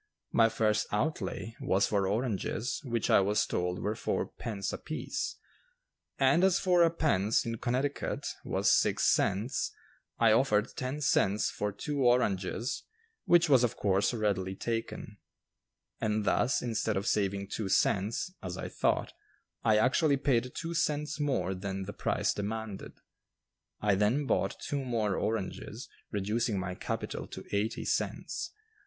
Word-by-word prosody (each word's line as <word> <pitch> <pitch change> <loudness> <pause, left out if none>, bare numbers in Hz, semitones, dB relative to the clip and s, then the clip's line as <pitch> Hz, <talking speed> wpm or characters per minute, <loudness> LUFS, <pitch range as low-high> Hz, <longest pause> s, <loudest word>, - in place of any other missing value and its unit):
My 115 -1 +5
first 110 -1 +1
outlay 115 -1 -2
was 95 +1 +2
for 100 -2 +1
oranges 110 +2 -1
which 120 -5 -1
I - - +7
was 100 +2 +2
told 90 0 -1
were 105 - -1
four - - -1
pence 100 -4 -5
apiece, 155 0 -4 0.8
and 175 - +4
as 190 -1 +5
"four 180 -3 +4
pence" 115 - +1
in 115 -1 -3
Connecticut 130 +3 -1 0.2
was - - +2
six - - +3
cents, 105 +7 +1 0.5
I 115 -2 +5
offered 110 -2 +3
ten 130 +3 -3
cents 105 -6 +2
for 105 0 -2
two 140 +8 -3
oranges 120 -2 +1 0.4
which 170 -1 +5
was 135 -4 +5
of 120 - +1
course 100 0 +2
readily 100 -5 -1
taken; 115 -1 -4 0.8
and 105 -1 0
thus, 125 +5 +2
instead 110 -3 0
of 100 - -2
saving 100 -2 0
two 105 -2 -3
cents, 105 - +1
as 90 -1 -5
I - - -5
thought, - - 0 0.5
I 110 -1 +4
actually 140 +6 +3
paid 125 -3 +1
two 165 0 -4
cents 150 -2 -1
more 135 -10 0
than 95 +1 -4
the 100 +2 -6
price - - 0
demanded. 105 0 -5 0.9
I 105 -1 +3
then 105 +9 +2
bought - - 0
two 140 -1 -3
more 110 -6 0
oranges, 110 -3 -3 0.2
reducing 105 +2 -1
my 90 -1 -3
capital - - -4
to - - -8
eighty 105 +2 -1
cents. - - -2
110 Hz, 140 wpm, -30 LUFS, 100-130 Hz, 0.9 s, I